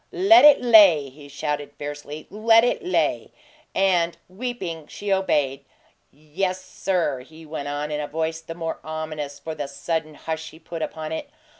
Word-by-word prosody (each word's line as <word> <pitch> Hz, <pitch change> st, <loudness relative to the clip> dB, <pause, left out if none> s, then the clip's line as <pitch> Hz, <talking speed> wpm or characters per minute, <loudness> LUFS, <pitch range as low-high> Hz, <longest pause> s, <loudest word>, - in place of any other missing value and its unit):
"Let 360 Hz, -4 st, +6 dB
it 295 Hz, -1 st, +9 dB
lay!" 200 Hz, -, +7 dB
he 145 Hz, +2 st, -14 dB
shouted, 145 Hz, 0 st, -4 dB
fiercely. 145 Hz, +1 st, -7 dB
"Let 225 Hz, +2 st, +5 dB
it 245 Hz, -, 0 dB
lay!" 365 Hz, -, 0 dB, 0.5 s
And, 175 Hz, -3 st, +2 dB
weeping, 185 Hz, -7 st, -5 dB
she 205 Hz, -1 st, -2 dB
obeyed. 145 Hz, -8 st, 0 dB, 0.5 s
"Yes, 180 Hz, +6 st, -3 dB
sir," 175 Hz, -8 st, -1 dB
he 160 Hz, +5 st, -14 dB
went 150 Hz, -2 st, -5 dB
on, 145 Hz, +1 st, -3 dB
in 150 Hz, 0 st, -2 dB
a 145 Hz, -, -4 dB
voice 160 Hz, +1 st, -2 dB
the 165 Hz, 0 st, -8 dB
more 165 Hz, -1 st, -4 dB
ominous 155 Hz, -2 st, -5 dB
for 160 Hz, -, -6 dB
the 150 Hz, -2 st, -4 dB
sudden 155 Hz, +2 st, -3 dB
hush 160 Hz, +1 st, -5 dB
he -, -, -15 dB
put 165 Hz, 0 st, -8 dB
upon 155 Hz, 0 st, -4 dB
it. 280 Hz, -, -4 dB
160 Hz, 165 wpm, -23 LUFS, 150-185 Hz, 0.5 s, it